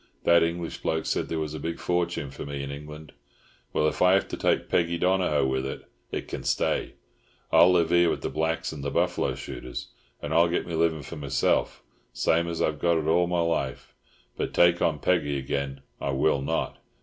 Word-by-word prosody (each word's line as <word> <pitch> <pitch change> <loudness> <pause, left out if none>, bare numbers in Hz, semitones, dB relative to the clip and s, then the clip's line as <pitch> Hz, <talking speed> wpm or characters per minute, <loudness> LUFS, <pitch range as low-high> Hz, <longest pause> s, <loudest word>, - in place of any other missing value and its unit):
That 85 0 +5
English 85 0 -2
bloke 80 0 -1
said - - -1
there 80 - -2
was 75 -1 -3
a 80 - -5
big 85 +3 -4
fortune 85 -5 -1
for - - -7
me 70 -1 -5
in 70 - -5
England. 75 +1 -9 0.6
Well, 75 - +2
if 75 - -2
I 90 0 +6
have 95 - +2
to - - -3
take - - +1
Peggy 85 0 +1
Donohoe 90 -5 +2
with 65 0 0
it, 70 - -5 0.3
it - - -4
can - - -6
stay. - - 0 0.6
I'll 90 - +7
live 85 -2 +2
here 85 -1 +5
with - - -2
the - - -1
blacks 80 +3 -1
and 75 -3 -7
the 70 - -1
buffalo - - 0
shooters, 60 - -7 0.3
and 75 - -4
I'll 85 +1 +5
get 85 - -1
my 85 - -6
livin' 80 -2 +1
for 85 - -8
meself, 70 -2 0 0.3
same 80 +7 +1
as 85 -1 -2
I - - +2
got 85 +3 +1
it 80 - -2
all 85 +2 +3
my 90 -1 +1
life; 70 -5 -2 0.4
but - - -3
take 85 0 +5
on 75 - +2
Peggy 75 -3 +1
again 70 0 -3 0.2
I 70 - -2
will 70 +1 +2
not. 70 - -2
80 Hz, 210 wpm, -26 LUFS, 70-85 Hz, 0.6 s, I'll